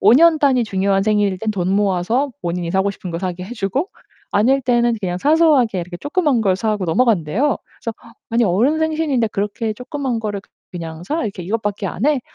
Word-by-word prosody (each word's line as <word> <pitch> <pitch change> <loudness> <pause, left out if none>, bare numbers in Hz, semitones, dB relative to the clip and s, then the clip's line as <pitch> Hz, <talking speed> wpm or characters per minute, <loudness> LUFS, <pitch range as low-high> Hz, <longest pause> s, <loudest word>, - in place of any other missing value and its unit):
5 205 - +6
년 320 +4 +6
단위 260 -5 +3
중요한 195 -1 +1
생일일 205 -3 +1
땐 220 +1 -1
돈 190 -2 -1
모아서 205 +7 +1
본인이 170 0 -2
사고 190 +2 +1
싶은 185 -2 -8
거 165 - -3
사게 180 0 -4
해 225 +6 -8
주고 250 - -1 0.4
아닐 260 +7 +3
때는 240 -2 +2
그냥 180 -3 -2
사소하게 285 - +3
이렇게 175 0 -7
쪼끄만 290 - +1
걸 190 -3 +2
사고 215 -2 -1
넘어간대요. 215 - +2 0.3
그래서 230 -2 -3 0.3
아니 230 +1 +2
"어른 230 - +2
생신인데 310 -7 0
그렇게 210 +2 -2
쪼끄만 250 +1 -3
거를 205 -2 -4 0.3
그냥 165 -1 -7
사? 310 - -2
이렇게 200 -4 -4
이것 220 +5 -2
밖에 205 -1 -2
안 190 +5 -3
해?" 290 -3 +3
215 Hz, 400 characters per minute, -19 LUFS, 190-260 Hz, 0.4 s, 5